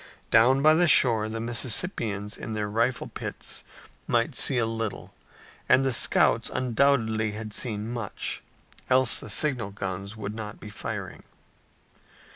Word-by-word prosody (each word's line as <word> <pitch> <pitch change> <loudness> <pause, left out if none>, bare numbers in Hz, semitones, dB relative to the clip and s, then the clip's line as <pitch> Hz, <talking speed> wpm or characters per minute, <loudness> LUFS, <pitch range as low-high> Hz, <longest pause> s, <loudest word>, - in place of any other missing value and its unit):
Down 130 +5 +5
by 155 0 +7
the 175 +2 +3
shore 115 -7 +5
the 115 +1 -5
Mississippians 115 - -1
in 110 - -7
their 105 -1 -2
rifle 115 +4 -1
pits - - -5 0.4
might - - +1
see 135 - +2
a 120 - +2
little, 115 -2 -5 0.6
and 135 - +4
the 135 - +1
scouts - - +3
undoubtedly 115 -4 +1
had 110 0 -7
seen 105 -2 -2
much, 115 -3 -4 0.5
else 130 -2 +4
the - - -6
signal 130 -9 0
guns 100 +1 -6
would 105 -1 -5
not 105 -1 -7
be 105 - -10
firing. - - -6
115 Hz, 140 wpm, -26 LUFS, 105-130 Hz, 0.6 s, by